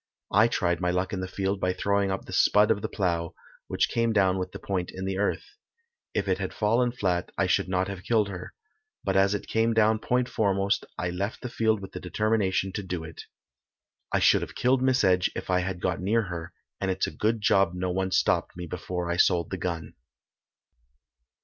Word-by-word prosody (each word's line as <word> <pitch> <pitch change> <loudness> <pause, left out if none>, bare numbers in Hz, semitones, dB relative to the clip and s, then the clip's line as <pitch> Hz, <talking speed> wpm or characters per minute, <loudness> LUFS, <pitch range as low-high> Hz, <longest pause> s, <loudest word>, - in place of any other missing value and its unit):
I 110 +4 +5
tried 85 -7 0
my 90 - +1
luck 90 +2 -1
in 95 - -2
the 95 - -3
field 95 +1 -2
by 90 -1 0
throwing 100 +1 +1
up 95 - -3
the - - -9
"spud" 105 +3 +4
of 105 -2 +1
the 110 - -3
plough, 85 -6 -1 0.3
which - - +1
came 115 -1 0
down 95 -2 +3
with 90 - -4
the - - -7
point 90 -3 -3
in 95 +1 -6
the 95 0 -2
earth. 105 - 0 0.7
If - - 0
it - - +1
had - - -4
fallen 115 +3 +2
flat 90 -7 -1
I 95 - +2
should 95 +1 +1
not 95 0 +1
have 100 -2 -6
killed 110 0 +2
her, 90 -3 -8 0.5
but 95 - 0
as 95 +1 +4
it - - -5
came 115 +1 +1
down 110 0 +4
point 125 +2 0
foremost 100 -3 0
I 90 - -2
left 100 +5 -3
the 125 - -5
field 110 -3 +1
with 95 - -8
the - - -6
determination 95 0 0
to 100 - -4
do 90 -3 -4
it. 80 0 -9 0.9
I - - +2
should - - +4
have - - -6
killed 125 +1 +2
Miss 130 -1 +3
Edge 90 -1 +3
if - - -4
I 90 - +3
had 90 0 -3
got 90 0 -1
near 110 +4 +2
her, 85 0 -6 0.3
and 95 - -1
it's 95 0 0
a - - -5
good 110 +1 0
job 95 -3 +3
no 90 0 -2
one 95 +1 -1
stopped 90 - +1
me 90 - -5
before 90 +1 -4
I 85 0 -1
sold 85 -3 +3
the 95 - -2
gun." 85 -3 -4
95 Hz, 220 wpm, -27 LUFS, 90-105 Hz, 0.9 s, I